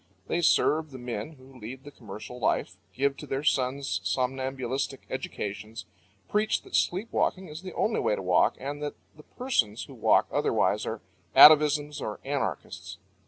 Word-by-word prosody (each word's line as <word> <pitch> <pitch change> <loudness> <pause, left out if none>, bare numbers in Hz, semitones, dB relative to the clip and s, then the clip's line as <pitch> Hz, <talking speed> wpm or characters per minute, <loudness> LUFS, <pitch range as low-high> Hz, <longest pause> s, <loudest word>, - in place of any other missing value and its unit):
They 175 - -1
serve 155 -1 +3
the 130 - -9
men 120 +3 -5
who 130 -2 -16
lead 125 +4 -8
the 145 - -10
commercial 110 0 -9
life, - - 0 0.2
give 140 +1 0
to - - -9
their 135 +2 -2
sons 135 -1 0
somnambulistic 130 +1 -2
educations, 110 -3 -5 0.4
preach 215 +1 +1
that - - -6
sleep 190 +6 +1
walking 185 -2 0
is 155 +2 -8
the 185 -1 -8
only 220 - +1
way 105 - +1
to - - -5
walk, 90 -1 +3
and 145 +2 -5
that 145 -1 -4 0.2
the 155 - -14
persons 120 - -1
who - - -11
walk - - +3
otherwise - - +1
are - - -4 0.3
atavisms 150 -1 +7
or 105 - -4
anarchists. 135 - -4
135 Hz, 165 wpm, -28 LUFS, 120-150 Hz, 0.4 s, atavisms